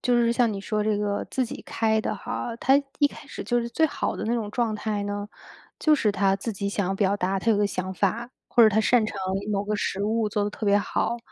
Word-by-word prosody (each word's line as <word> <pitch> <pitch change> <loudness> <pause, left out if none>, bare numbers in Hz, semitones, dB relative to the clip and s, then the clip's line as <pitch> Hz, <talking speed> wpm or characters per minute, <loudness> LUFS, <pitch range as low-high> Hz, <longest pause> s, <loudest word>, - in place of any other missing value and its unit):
就 245 -1 +2
是 235 -1 +3
像 235 -1 +2
你 195 - -4
说 210 +1 -1
这 210 -1 +1
个 205 -1 -1
自 260 - 0
己 230 - -7
开 220 -1 +1
的 - - -2
哈， 235 - -4
它 270 +2 +5 0.2
一 290 - +7
开 - - -13
始 - - -7
就 240 - +1
是 235 - -3
最 320 +7 +2
好 310 - -1
的 - - -5
那 230 - 0
种 225 -3 -1
状 235 -2 0
态 210 -1 -2
呢， 205 0 -4 0.5
就 310 - +4
是 220 -9 +3
他 195 0 +2
自 225 +3 -4
己 200 0 -3
想 195 -1 -1
表 195 0 +1
达 190 0 0
他 230 - +1
有 215 - +4
个 205 0 +2
想 185 -1 -3
法， 220 +6 -1 0.2
或 240 - +4
者 220 - +8
他 215 +1 +2
擅 235 +1 +3
长 215 - -5 0.3
某 200 -1 0
个 210 +1 -1
食 200 -1 -2
物 220 +1 +1
做 205 0 0
得 205 - -2
特 215 - -6
别 200 0 +4
好， 235 +3 -1
210 Hz, 280 characters per minute, -25 LUFS, 200-235 Hz, 0.5 s, 者